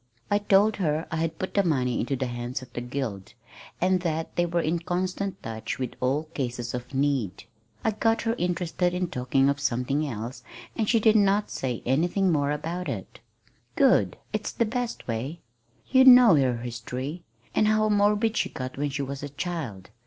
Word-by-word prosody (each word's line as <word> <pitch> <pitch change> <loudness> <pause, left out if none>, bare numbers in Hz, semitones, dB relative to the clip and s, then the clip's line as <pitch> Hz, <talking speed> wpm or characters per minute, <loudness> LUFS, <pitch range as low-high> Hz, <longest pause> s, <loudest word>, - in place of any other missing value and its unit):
I 205 - +4
told 205 +1 +3
her 160 -4 0
I 165 - -1
had 160 0 -1
put 185 - -4
the 200 - +3
money 130 -8 +1
into 135 +3 -1
the 130 - -2
hands 120 +1 -4
of 130 - -15
the 120 - -4
Guild, 120 -5 -5 0.4
and 185 +1 +3
that 165 -2 -3
they 175 0 +2
were 170 0 0
in 165 +2 0
constant 185 +3 -3
touch 110 0 -4
with 130 -2 -3
all 135 +4 +1
cases 120 -3 -3
of 125 +1 -5
need. 135 -8 0 0.4
I 220 - +2
got 225 +2 +1
her 225 0 +1
interested 180 0 0
in 180 -1 -1
talking 130 +2 +1
of 140 0 +1
something 140 +2 0
else, 115 0 -5 0.3
and 220 -2 0
she 230 - +4
did 220 0 +4
not 205 0 +3
say 125 -3 -3
anything 175 +8 +2
more 145 -3 +1
about 165 +5 -3
it." - - -6 0.6
"Good! - - +3 0.2
It's - - -2
the 235 - +1
best 245 +1 -3
way. 130 +8 -4 0.5
You 260 0 +7
know 250 -5 +9
her 130 -5 +3
history, 125 +6 -5 0.3
and 215 - +3
how 215 0 +3
morbid 210 +2 +2
she - - 0
got 130 0 -6
when 145 0 0
she 140 0 -3
was 140 0 -5
a 145 - -5
child. 140 - -5
155 Hz, 190 wpm, -26 LUFS, 130-190 Hz, 0.6 s, know